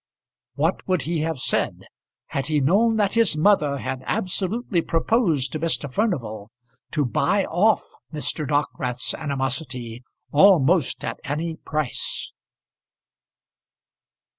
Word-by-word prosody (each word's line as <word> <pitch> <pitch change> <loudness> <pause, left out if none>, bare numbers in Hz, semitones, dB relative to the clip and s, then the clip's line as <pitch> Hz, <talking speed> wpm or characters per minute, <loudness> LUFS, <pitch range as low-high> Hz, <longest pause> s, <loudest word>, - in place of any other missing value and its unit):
What - - 0
would 185 -4 +1
he 165 +1 -1
have 160 0 -1
said - - -1 0.5
had 135 - -2
he 155 -1 +2
known 205 +11 +3
that 205 -2 +1
his 230 -9 +3
mother 155 -5 +3
had 130 -1 -4
absolutely 190 +1 -1
proposed 165 - +1
to 155 - -3
Mr. 165 -2 -1
Furnival 120 - -2 0.4
to 150 -3 +1
buy 145 - +1
off 210 +6 +2 0.3
Mr. 150 -1 -2
Dockwrath's 130 -4 0
animosity, 130 -4 -3 0.3
almost 165 -3 +4
at - - -4
any 160 +3 -3
price? 155 -6 -3
155 Hz, 115 wpm, -23 LUFS, 135-185 Hz, 0.5 s, almost